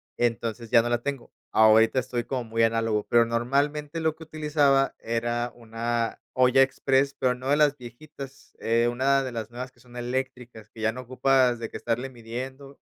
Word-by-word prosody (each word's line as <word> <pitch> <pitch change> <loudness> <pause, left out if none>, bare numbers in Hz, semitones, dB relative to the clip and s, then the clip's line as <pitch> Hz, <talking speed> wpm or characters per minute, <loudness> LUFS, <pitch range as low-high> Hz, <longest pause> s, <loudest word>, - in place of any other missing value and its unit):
entonces 115 -1 -2
ya 115 -1 +5
no 120 - -2
la 120 0 0
tengo, 140 -1 -5 0.2
ahorita 110 +2 +5
estoy 125 -2 -1
como 130 -2 -3
muy 115 0 -2
análogo, 115 -2 +1
pero 120 0 +5
normalmente 145 +7 -1
lo 160 -1 0
que 160 - -12
utilizaba 150 -3 +2
era 120 +1 -2
una 115 0 -3
olla 130 +1 +4
express, 135 +1 +2
pero 125 -1 +2
no 130 +2 -6
de 145 - +4
las 150 -1 +4
viejitas, 135 +3 -11
eh, 115 +1 +2
una 135 +2 +2
de 130 - -4
las 115 -1 -5
nuevas 125 +2 -7
que 125 - -29
son 120 0 -17
eléctricas 120 -3 -5
que 110 - -12
ya 110 - +2
no 125 +2 -7
ocupas 130 0 +2
de 115 -1 -6
que - - -5
estarle 120 +3 -2
midiendo, 130 +4 -8
125 Hz, 185 wpm, -26 LUFS, 115-135 Hz, 0.2 s, ya